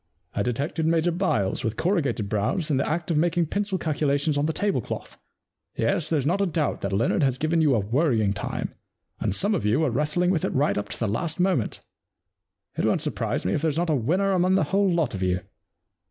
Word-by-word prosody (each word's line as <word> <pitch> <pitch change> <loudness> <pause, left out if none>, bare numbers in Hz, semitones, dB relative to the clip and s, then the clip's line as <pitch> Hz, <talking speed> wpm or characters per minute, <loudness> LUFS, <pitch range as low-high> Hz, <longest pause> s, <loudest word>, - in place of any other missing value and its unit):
I - - -1
detected 145 +8 -1
Major 165 +1 +2
Byles, 125 - 0
with 115 -2 -2
corrugated 140 - 0
brows, 130 - -1
in 140 - +2
the 135 - 0
act 170 +2 -2
of 160 - +1
making 170 +1 +2
pencil 200 +3 -2
calculations 145 -2 0
on 145 +1 +1
the - - +1
tablecloth. 200 +4 -2 0.6
Yes, 180 -6 0
there's 150 -5 +1
not 180 +6 +1
a 200 - +2
doubt 155 -3 -1
that - - -2
Leonard 100 +4 +1
has 135 -3 +2
given 160 +3 +1
you 145 -5 +4
a - - +2
worrying 110 -1 +1
time, 100 - -4 0.5
and - - -1
some 205 - +1
of 185 - -1
you 110 +8 +2
were 155 -5 +1
wrestling 150 +7 +1
with 165 -5 0
it - - -1
right 145 +3 +2
up 105 0 -3
to - - -6
the 115 - 0
last 155 - -2
moment. 180 - 0 0.9
It - - -1
won't - - +1
surprise - - -2
me 95 - +1
if - - 0
there's 155 -2 0
not 170 -1 +1
a - - +3
winner 180 - +1
among 185 0 +3
the 195 - +3
whole 195 -1 +3
lot 165 -8 0
of 95 - -4
you. 90 -1 +1
155 Hz, 220 wpm, -25 LUFS, 120-175 Hz, 0.9 s, you